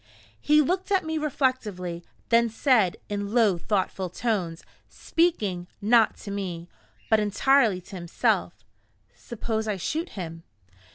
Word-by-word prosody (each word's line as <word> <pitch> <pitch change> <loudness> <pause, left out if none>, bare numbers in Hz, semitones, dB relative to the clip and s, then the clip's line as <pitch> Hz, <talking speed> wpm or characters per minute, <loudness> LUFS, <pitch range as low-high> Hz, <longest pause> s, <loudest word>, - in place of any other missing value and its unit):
He 300 0 +4
looked 370 +6 -2
at 385 -4 +2
me 320 0 -2
reflectively; 215 - -2 0.3
then 235 0 +4
said, 225 - +2
in 205 +1 -4
low, 210 -7 +4
thoughtful 190 -1 -1
tones, 180 -5 -2 0.3
speaking, 210 - 0
not 225 +2 +4
to 200 - -7
me, 180 -4 -4 0.4
but 220 - +4
entirely 210 0 +3
to 185 +2 -10
himself: 170 -1 -1 0.5
"Suppose 220 -2 -4
I 210 -2 -1
shoot 320 - -3
him?" 165 -3 -6
210 Hz, 125 wpm, -26 LUFS, 185-255 Hz, 0.5 s, He